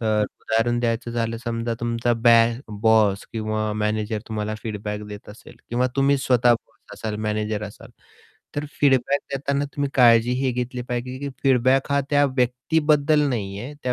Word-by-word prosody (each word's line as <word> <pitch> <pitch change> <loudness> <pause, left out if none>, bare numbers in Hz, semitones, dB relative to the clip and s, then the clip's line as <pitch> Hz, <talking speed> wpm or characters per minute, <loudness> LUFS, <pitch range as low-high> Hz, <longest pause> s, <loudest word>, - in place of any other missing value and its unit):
तर 110 -2 +1 0.2
उदाहरण 120 +2 0
द्यायचं 120 0 -1
झालं 115 -1 -2
समजा 115 0 -2
तुमचा 120 0 0
बॅक 115 +1 +4
बॉस 110 -3 +3
किंवा 110 -1 -2
मॅनेजर 105 +1 -1
तुम्हाला 110 -1 -3
फीडबॅक 105 -1 -4
देत 105 0 -10
असेल 105 - -14
किंवा 125 +2 +1
तुम्ही 140 +1 +3
स्वतः 125 -2 +3
बॉस 115 0 -13
असाल, 110 -1 -4
मॅनेजर 105 0 -2
असाल 105 - -11 0.7
तर 145 - -1 0.2
फीडबॅक 140 0 +3
देताना 140 +1 -1
तुम्ही 140 -1 -1
काळजी 120 -1 +5
हे 135 - +1
घेतली 125 0 -3
पाहिजे, 125 +1 -4
की 140 +1 -4
फीडबॅक 130 +1 +3
हा 140 - +3
त्या 145 0 +4
व्यक्तीबद्दल 150 +4 +2
नाही 100 -6 -3
आहे 135 +7 -7
त्या 125 - 0
120 Hz, 160 wpm, -23 LUFS, 110-130 Hz, 0.7 s, काळजी